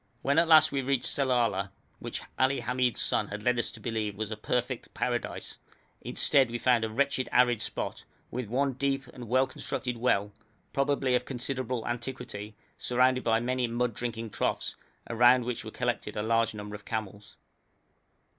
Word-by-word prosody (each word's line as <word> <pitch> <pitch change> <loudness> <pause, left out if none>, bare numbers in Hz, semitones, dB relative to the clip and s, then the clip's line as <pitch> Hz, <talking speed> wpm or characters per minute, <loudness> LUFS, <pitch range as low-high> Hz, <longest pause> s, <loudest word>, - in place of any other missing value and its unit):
When 140 +3 +3
at 170 - +4
last 155 -1 +7
we 140 -1 0
reached 135 -1 0
Sellala, 120 -8 +1 0.3
which - - -5 0.2
Ali 130 +1 +3
Hamid's 125 -1 0
son - - +1
had 105 +1 -6
led 125 0 +2
us - - 0
to 115 - -10
believe 110 -2 -2
was 110 +1 -4
a - - -2
perfect 125 +3 -2
Paradise, - - -2 0.4
instead 135 -3 +3
we 120 - -2
found 120 -1 +3
a 110 - -1
wretched 130 +2 0
arid 120 -3 +4
spot, - - -4 0.3
with 125 -1 -3
one 135 +3 +1
deep 135 +1 -1
and 120 -2 -8
well 130 +2 +4
constructed 125 -1 -4
well, 105 -4 +1 0.4
probably 140 -2 +1
of 125 - +2
considerable 130 -2 -3
antiquity, 120 -4 -5 0.2
surrounded 125 +1 +2
by 115 -1 +3
many 125 +1 0
mud 120 0 0
drinking 115 -1 -4
troughs, - - -1 0.3
around 120 +1 +5
which 125 -1 -3
were - - -6
collected - - -2
a 105 - 0
large 115 0 +2
number 105 0 -7
of 105 0 -8
camels. 105 -1 -5
125 Hz, 170 wpm, -29 LUFS, 115-130 Hz, 0.4 s, last